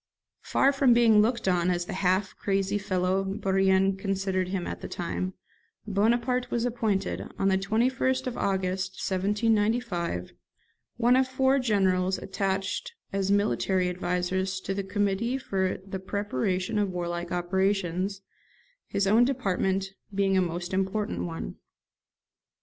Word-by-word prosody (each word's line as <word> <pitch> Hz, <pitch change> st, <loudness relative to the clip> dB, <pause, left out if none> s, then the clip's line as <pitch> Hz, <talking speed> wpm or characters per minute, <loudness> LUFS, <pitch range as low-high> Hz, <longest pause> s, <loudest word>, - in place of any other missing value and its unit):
Far 275 Hz, -, +3 dB
from 270 Hz, -3 st, +4 dB
being 225 Hz, -3 st, +6 dB
looked 235 Hz, 0 st, 0 dB
on 180 Hz, -1 st, +2 dB
as 175 Hz, -1 st, 0 dB
the 190 Hz, -, -5 dB
half 185 Hz, +1 st, +1 dB
crazy 195 Hz, +1 st, 0 dB
fellow 185 Hz, 0 st, 0 dB
Bourrienne 195 Hz, 0 st, +2 dB
considered 195 Hz, -1 st, -1 dB
him 185 Hz, -1 st, -2 dB
at -, -, -5 dB
that -, -, -6 dB
time, 185 Hz, +2 st, -3 dB, 0.5 s
Bonaparte 235 Hz, +5 st, +1 dB
was 235 Hz, 0 st, 0 dB
appointed, 220 Hz, -5 st, -1 dB
on 195 Hz, -, +2 dB
the 190 Hz, -, +3 dB
21st 250 Hz, +6 st, +1 dB
of 250 Hz, -1 st, -3 dB
August 190 Hz, -1 st, -1 dB
1795, 205 Hz, -, 0 dB, 0.6 s
one 240 Hz, +1 st, +4 dB
of 260 Hz, 0 st, +3 dB
four 265 Hz, +1 st, +2 dB
generals 190 Hz, -5 st, +2 dB
attached 195 Hz, -, -2 dB, 0.2 s
as 195 Hz, -1 st, 0 dB
military 185 Hz, -, +2 dB
advisers 185 Hz, +1 st, -1 dB
to 195 Hz, -, -3 dB
the 200 Hz, 0 st, -2 dB
Committee 205 Hz, +5 st, 0 dB
for 190 Hz, -7 st, -1 dB
the 195 Hz, -1 st, -5 dB
preparation 190 Hz, 0 st, -1 dB
of 205 Hz, -2 st, +1 dB
warlike 175 Hz, -1 st, -3 dB
operations, 190 Hz, +1 st, 0 dB, 0.6 s
his 200 Hz, -, 0 dB
own 220 Hz, +5 st, +5 dB
department 195 Hz, -6 st, 0 dB, 0.2 s
being 195 Hz, -1 st, +1 dB
a 190 Hz, -, +4 dB
most 175 Hz, +1 st, -3 dB
important 195 Hz, +2 st, -1 dB
one. 165 Hz, -1 st, -6 dB
195 Hz, 135 wpm, -27 LUFS, 185-215 Hz, 0.6 s, being